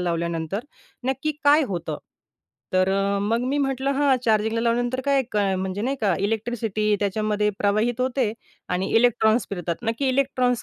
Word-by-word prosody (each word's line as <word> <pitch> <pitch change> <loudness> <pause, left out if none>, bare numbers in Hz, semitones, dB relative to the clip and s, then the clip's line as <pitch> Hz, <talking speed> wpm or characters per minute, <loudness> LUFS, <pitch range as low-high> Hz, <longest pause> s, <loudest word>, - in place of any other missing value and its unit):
लावल्यानंतर 170 +1 -2 0.4
नक्की 270 +4 -1
काय 295 +2 +6
होतं? 170 -5 -4 0.7
तर 185 0 +3 0.3
मग 225 +3 +1
मी 285 +2 0
म्हटलं 270 -1 0
हां, 280 -1 +3
"चार्जिंगला 220 0 +2
लावल्यानंतर 240 +2 0
काय 235 -8 +1
म्हणजे 190 +2 -3
नाही 270 +4 -1
का 200 -5 +2
इलेक्ट्रिसिटी 215 0 0
त्याच्यामध्ये 210 +1 0
प्रवाहित 215 +4 +1
होते 255 -3 0 0.4
आणि 180 +2 -1
इलेक्ट्रॉन्स 230 -1 +3
फिरतात." 175 -3 -3
नक्की 235 +4 -1
इलेक्ट्रॉन्स 255 -2 +1
225 Hz, 135 wpm, -24 LUFS, 200-255 Hz, 0.7 s, काय